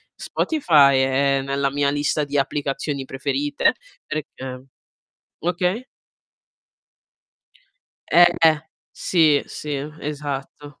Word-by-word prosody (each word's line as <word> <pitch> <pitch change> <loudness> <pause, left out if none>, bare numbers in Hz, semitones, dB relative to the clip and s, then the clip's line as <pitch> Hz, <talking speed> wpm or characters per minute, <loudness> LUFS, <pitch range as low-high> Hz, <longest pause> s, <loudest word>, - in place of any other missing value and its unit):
Spotify 150 - +3
è 135 +1 +2
nella 140 0 0
mia 140 0 0
lista 145 +1 0
di 145 0 -6
applicazioni 140 0 -2
preferite 140 +2 0 0.3
perché 130 -4 -6 0.7
okay? 180 +7 -1 2.3
Eh. 175 0 +7 0.6
Sì, 155 -5 +3
sì, 150 - -7 0.3
esatto. 145 -1 -6
145 Hz, 80 wpm, -22 LUFS, 140-150 Hz, 2.3 s, Eh